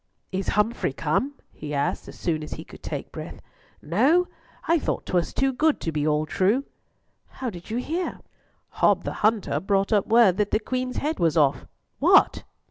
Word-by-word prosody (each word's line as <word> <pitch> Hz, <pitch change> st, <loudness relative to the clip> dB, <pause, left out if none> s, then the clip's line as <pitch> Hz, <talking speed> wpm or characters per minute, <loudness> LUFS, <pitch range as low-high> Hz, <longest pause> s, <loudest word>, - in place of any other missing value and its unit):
"Is 190 Hz, 0 st, -3 dB
Humfrey 210 Hz, -, +1 dB
come?" 195 Hz, -, -1 dB, 0.2 s
he 150 Hz, -1 st, -6 dB
asked 140 Hz, 0 st, -1 dB
as -, -, -10 dB
soon 160 Hz, -3 st, -1 dB
as 150 Hz, -, -6 dB
he -, -, -7 dB
could -, -, -14 dB
take -, -, -5 dB
breath. -, -, -8 dB, 0.4 s
"No? 280 Hz, -, +3 dB, 0.4 s
I 335 Hz, 0 st, +4 dB
thought -, -, -2 dB
'twas 175 Hz, -3 st, 0 dB
too 270 Hz, 0 st, +1 dB
good 305 Hz, +4 st, +2 dB
to 165 Hz, -, -2 dB
be 150 Hz, -1 st, -1 dB
all 150 Hz, 0 st, +1 dB
true." 200 Hz, -, +1 dB, 0.6 s
"How 255 Hz, -3 st, -5 dB
did 175 Hz, 0 st, -11 dB
you 225 Hz, -, -2 dB
hear?" 330 Hz, +8 st, -3 dB, 0.6 s
"Hob -, -, +4 dB
the -, -, -3 dB
hunter 215 Hz, -1 st, +2 dB
brought 195 Hz, +1 st, +1 dB
up 205 Hz, -2 st, +2 dB
word 225 Hz, -5 st, +5 dB
that 210 Hz, -1 st, +1 dB
the 215 Hz, -, +1 dB
Queen's 255 Hz, +2 st, -3 dB
head 305 Hz, +3 st, -2 dB
was 165 Hz, -2 st, +2 dB
off. 140 Hz, -4 st, +2 dB, 0.3 s
What?" -, -, +5 dB
210 Hz, 185 wpm, -25 LUFS, 165-255 Hz, 0.6 s, word